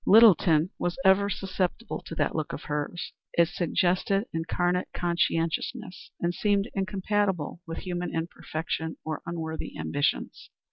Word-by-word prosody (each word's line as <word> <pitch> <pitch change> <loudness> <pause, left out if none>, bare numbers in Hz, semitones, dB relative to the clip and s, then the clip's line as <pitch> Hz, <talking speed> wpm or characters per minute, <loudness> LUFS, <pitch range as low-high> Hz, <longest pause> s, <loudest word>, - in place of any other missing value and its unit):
Littleton 185 -6 +6
was 175 - -1
ever 200 +1 +5
susceptible 190 +3 -2
to 165 - -6
that - - +1
look 155 -2 -2
of - - -5
hers. 150 +3 -3 0.2
It 170 -1 +4
suggested 180 +3 +1
incarnate 175 +2 0
conscientiousness, 175 +5 -1
and 175 0 0
seemed 205 +3 +1
incompatible 195 -4 0
with 165 - -5
human 180 -1 -3
imperfection 160 -1 -3
or 155 -1 -3
unworthy 160 -2 -4
ambitions. 145 0 -1
175 Hz, 125 wpm, -28 LUFS, 165-195 Hz, 0.2 s, Littleton